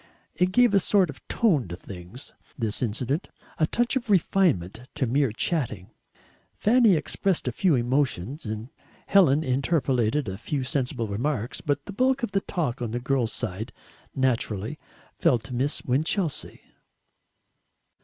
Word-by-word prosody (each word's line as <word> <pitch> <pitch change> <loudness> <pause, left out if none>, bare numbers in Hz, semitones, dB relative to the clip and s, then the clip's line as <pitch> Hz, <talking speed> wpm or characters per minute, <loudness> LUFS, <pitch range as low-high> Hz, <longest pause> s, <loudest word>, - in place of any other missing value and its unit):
It 180 0 +1
gave 245 +1 +4
a 200 - +6
sort 185 -3 +3
of 145 - -16
tone 170 - +2
to 85 - -6
things, 95 +8 -11 0.2
this 110 -5 0
incident 125 - -1 0.3
a 155 - +3
touch 240 +7 0
of 245 -3 -2
refinement 130 - +1
to 130 - 0
mere 135 +1 +1
chatting. 115 - -2 0.6
Fanny 225 -3 +4
expressed 160 +2 0
a - - +1
few 170 +6 +2
emotions, 130 - -1
and 110 +3 -5 0.4
Helen 160 -7 +4
interpolated 135 -2 +1
a 95 +1 -5
few 135 +3 -2
sensible 130 -4 -1
remarks, 120 +3 -2
but 145 -1 -1
the 200 - -7
bulk 260 +4 +1
of 235 - -1
the 195 0 +1
talk 145 -12 -3
on 120 - -2
the 120 +2 -2
girls' 125 -2 0
side 110 -1 -4 0.4
naturally 120 -1 -1 0.3
fell 125 - +3
to 110 +2 -9
Miss 135 +5 0
Winchelsea. 155 +5 -1
135 Hz, 145 wpm, -26 LUFS, 115-175 Hz, 0.6 s, a